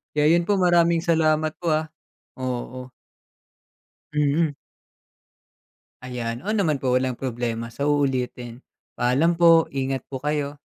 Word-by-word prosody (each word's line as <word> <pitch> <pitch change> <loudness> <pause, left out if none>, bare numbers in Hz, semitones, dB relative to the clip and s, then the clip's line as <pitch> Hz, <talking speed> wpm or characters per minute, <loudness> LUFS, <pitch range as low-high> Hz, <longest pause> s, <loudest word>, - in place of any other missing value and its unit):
Kaya 150 0 +3
'yun 170 0 +2
po, 205 - +3
maraming 170 -2 +3
salamat 155 -2 +2
po, 175 - -5
ah, 155 +1 0 0.5
oo. 125 0 -4 1.3
Mm. 150 +1 +1 1.5
'Ayan, 120 +1 -5
oo 215 - 0
naman 170 -9 +1
po, 130 -2 -1
walang 130 -1 0
problema, 115 -2 -4
sa 140 +1 -1
uulitin. 130 -4 -1 0.3
Paalam 135 +8 +2
po. 165 -1 +5
Ingat 135 -1 -2
po 130 -2 -6
kayo. 145 -1 -2
145 Hz, 125 wpm, -23 LUFS, 125-165 Hz, 1.5 s, po